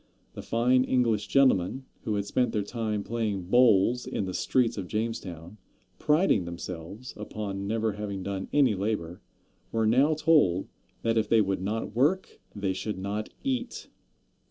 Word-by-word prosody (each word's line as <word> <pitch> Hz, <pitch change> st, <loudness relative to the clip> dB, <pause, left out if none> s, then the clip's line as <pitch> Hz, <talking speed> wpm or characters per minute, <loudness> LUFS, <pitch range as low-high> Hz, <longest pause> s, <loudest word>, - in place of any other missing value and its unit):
The -, -, -7 dB
fine 125 Hz, +2 st, +2 dB
English 120 Hz, -5 st, +1 dB
gentlemen, 130 Hz, -2 st, +2 dB, 0.2 s
who 110 Hz, -3 st, 0 dB
had 100 Hz, -1 st, -1 dB
spent 125 Hz, +2 st, 0 dB
their 105 Hz, -, 0 dB
time 105 Hz, -1 st, -3 dB
playing 110 Hz, -5 st, -2 dB
bowls 120 Hz, 0 st, +4 dB
in 100 Hz, -, -2 dB
the 95 Hz, -, -4 dB
streets 120 Hz, +4 st, +1 dB
of 95 Hz, -3 st, -5 dB
Jamestown, 100 Hz, -4 st, -4 dB, 0.4 s
priding 150 Hz, -, +3 dB
themselves 85 Hz, +6 st, -7 dB
upon 100 Hz, -2 st, -5 dB
never 110 Hz, +1 st, 0 dB
having 100 Hz, -2 st, -5 dB
done 95 Hz, -1 st, -4 dB
any 140 Hz, -6 st, +4 dB
labor, 95 Hz, -4 st, -3 dB, 0.5 s
were 115 Hz, -1 st, +1 dB
now 135 Hz, +8 st, +4 dB
told 150 Hz, -, +3 dB, 0.4 s
that 115 Hz, 0 st, +2 dB
if 110 Hz, -, -2 dB
they 115 Hz, -, +5 dB
would 95 Hz, -3 st, 0 dB
not 105 Hz, +2 st, -3 dB
work 150 Hz, +10 st, +1 dB
they 100 Hz, -2 st, -1 dB
should 105 Hz, +2 st, -4 dB
not 100 Hz, +3 st, -3 dB
eat. 255 Hz, -2 st, -3 dB
110 Hz, 155 wpm, -28 LUFS, 100-125 Hz, 0.5 s, they